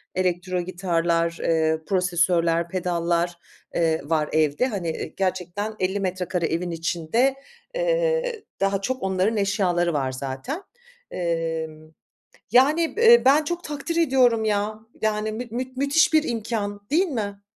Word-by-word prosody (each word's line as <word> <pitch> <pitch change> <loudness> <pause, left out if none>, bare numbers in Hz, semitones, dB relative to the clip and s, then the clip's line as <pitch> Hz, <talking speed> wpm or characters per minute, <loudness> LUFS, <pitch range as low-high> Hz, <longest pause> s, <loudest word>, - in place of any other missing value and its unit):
elektro 180 0 0
gitarlar, 170 -2 0
eee, 160 -1 +1
prosesör'ler, 170 -2 +2
pedallar, 175 -1 -1 0.4
eee, 160 -1 +1
var 155 0 0
evde. 155 - +2
Hani, 190 -8 -3
ııı, - - -4
gerçekten 190 +3 -2
50 190 +2 0
metrekare 180 -2 -1
evin 170 +2 -2
içinde, 170 +11 0 0.4
eee, - - 0 0.2
daha 195 0 +1
çok 255 +2 -3
onların 190 +3 +1
eşyaları 180 -4 +1
var 135 -3 0
zaten. 135 - -5 0.5
Emm, 165 -2 -3 0.6
yani, 305 +8 +4
b 460 - 0
eee, 475 - +7
ben 290 +3 +5
çok 345 +2 -3
takdir 300 +3 -4
ediyorum 255 -8 +3
ya, 210 0 0 0.2
yani, 215 0 0
müt 230 +1 -6
müt 255 +1 -4
müthiş 280 +5 +3
bir 310 -1 +5
imkân, 220 -5 -3
değil 345 +6 +3
mi? 205 -6 -4
190 Hz, 135 wpm, -24 LUFS, 170-250 Hz, 0.6 s, eee